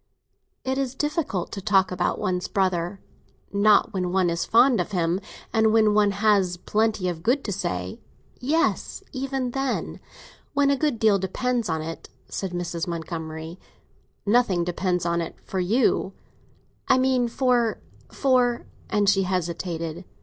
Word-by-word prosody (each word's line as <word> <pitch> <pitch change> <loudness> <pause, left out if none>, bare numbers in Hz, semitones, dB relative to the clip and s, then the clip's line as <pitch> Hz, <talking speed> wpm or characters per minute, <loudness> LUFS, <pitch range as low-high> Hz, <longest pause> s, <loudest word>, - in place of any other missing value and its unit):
"It 265 +1 0
is 265 -1 -2
difficult 295 - -2
to 195 - -5
talk 190 -2 +3
about 180 -1 0
one's 180 -3 -1
brother." 185 -1 0 0.5
"Not 205 +1 +4
when 180 -2 -1
one 185 -2 +2
is 170 -1 -1
fond 240 +1 +5
of - - -6
him, 175 0 +1 0.3
and 220 -1 +4
when 215 -1 +4
one 210 -1 +4
has 200 -3 +2
plenty 215 0 0
of 170 -2 -3
good 255 - +1
to 205 - -3
say." 90 - -3 0.4
"Yes, 315 +7 0
even 265 -1 -2
then, 270 0 -2 0.6
when 280 0 +4
a - - +3
good 290 -3 0
deal 215 -3 +3
depends 235 +5 -1
on 160 -1 -1
it," 165 +1 -7 0.2
said 195 - -4
Mrs. 175 -1 -3
Montgomery. 160 0 -5 0.7
"Nothing 205 -5 +3
depends 180 0 -1
on 170 0 +1
it, 165 - -5
for 190 - -3
you." 200 0 +1 0.7
"I 260 - +5
mean 255 -1 +2
for—for—" 240 - 0 0.2
and 205 -1 +1
she 195 0 +4
hesitated. 170 -2 -3
195 Hz, 145 wpm, -25 LUFS, 175-245 Hz, 0.7 s, fond